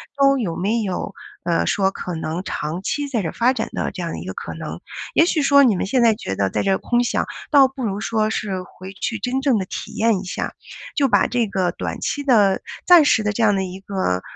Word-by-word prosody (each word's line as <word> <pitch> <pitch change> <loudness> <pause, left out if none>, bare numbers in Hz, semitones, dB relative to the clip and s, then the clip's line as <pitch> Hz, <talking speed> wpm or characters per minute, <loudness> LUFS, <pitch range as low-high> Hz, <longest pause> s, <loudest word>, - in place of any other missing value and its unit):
都 275 -1 +4
有 185 -9 -2
没 210 +6 0
有， 195 0 -3 0.3
呃， 170 -1 +1
说 195 -1 +2
可 180 -2 -6
能 160 +2 -3
长 160 -1 -4
期 290 +7 -2
在 240 -5 0
这 165 - -2
儿 - - -6
发 240 +2 +3
展 - - -3
的 - - -2
这 - - -7
样 - - -3
的 - - -5
一 - - -8
个 - - -5
可 - - -6
能。 - - -7 0.3
也 325 - +5
许 330 -3 +1
说 280 0 +6
你 235 -6 +4
们 - - -1
现 245 +6 +1
在 230 -1 +5
觉 95 - -5
得 95 0 0
在 - - -1
这 195 -1 +2
空 240 0 +1
想， 240 - 0 0.3
倒 280 -3 +7
不 265 0 -7
如 200 -1 -2
说 220 -1 0
是 195 -4 -3
回 185 +1 -11
去 225 +4 -3
真 255 +2 -1
正 265 -4 +3
地 190 - -3
体 - - -7
验 225 -3 +2
一 - - -7
下， 180 - -4 0.4
就 280 - +3
把 205 -3 +4
这 245 -2 +1
个 190 -3 0
短 - - -5
期 285 - -2
的 210 -8 +4 0.3
暂 350 -3 +8
时 225 - +4
的 210 - 0
这 230 - 0
样 210 -2 +5
的 190 - 0
一 185 0 -6
个， 190 - -1
210 Hz, 270 characters per minute, -21 LUFS, 190-255 Hz, 0.4 s, 暂